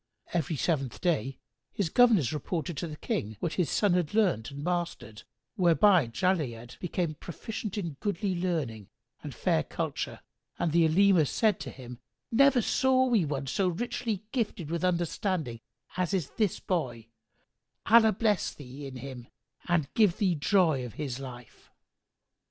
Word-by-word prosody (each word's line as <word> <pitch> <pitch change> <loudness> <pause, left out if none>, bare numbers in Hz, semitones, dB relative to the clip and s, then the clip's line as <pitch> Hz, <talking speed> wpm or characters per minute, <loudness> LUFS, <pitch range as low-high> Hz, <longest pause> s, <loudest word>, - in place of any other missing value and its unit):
Every 165 -2 0
seventh 135 -4 -1
day 140 -7 0 0.3
his 195 -5 -1
governors 215 - +4
reported 160 +1 -3
to 170 - -3
the 155 - -7
King 110 -6 -3
what 170 - -2
his 180 -4 0
son 205 -4 +2
had 180 +1 0
learnt 180 - +2
and 140 +1 -8
mastered, 170 -11 -3 0.4
whereby 180 - +5
Jali'ad 125 -6 -2
became 175 -2 -2
proficient 210 +6 -6
in 170 -8 -4
goodly 200 -1 -1
learning 155 - -2 0.3
and - - -7
fair - - +1
culture, - - -4 0.4
and 165 - 0
the 165 +1 +4
Olema 175 -1 +4
said 215 - +1
to - - -6
him, 125 -2 -10 0.3
"Never 260 0 +5
saw 260 +2 +3
we 230 -9 +2
one 140 -2 -3
so 185 +8 0
richly 225 +2 -2
gifted 210 - -2
with 170 +1 -2
understanding 175 - -1 0.3
as 185 +1 0
is 170 -7 -2
this 210 -5 0
boy: 125 - -2 0.8
Allah 220 0 +6
bless 210 0 +1
thee 140 0 -9
in 135 - -9
him 125 -2 -8 0.4
and 170 -5 0
give 210 -6 +3
thee 190 -4 +2
joy 160 -3 +2
of 120 -5 -8
his 135 -4 -4
life!" 125 -3 -11
170 Hz, 150 wpm, -29 LUFS, 135-200 Hz, 0.8 s, Allah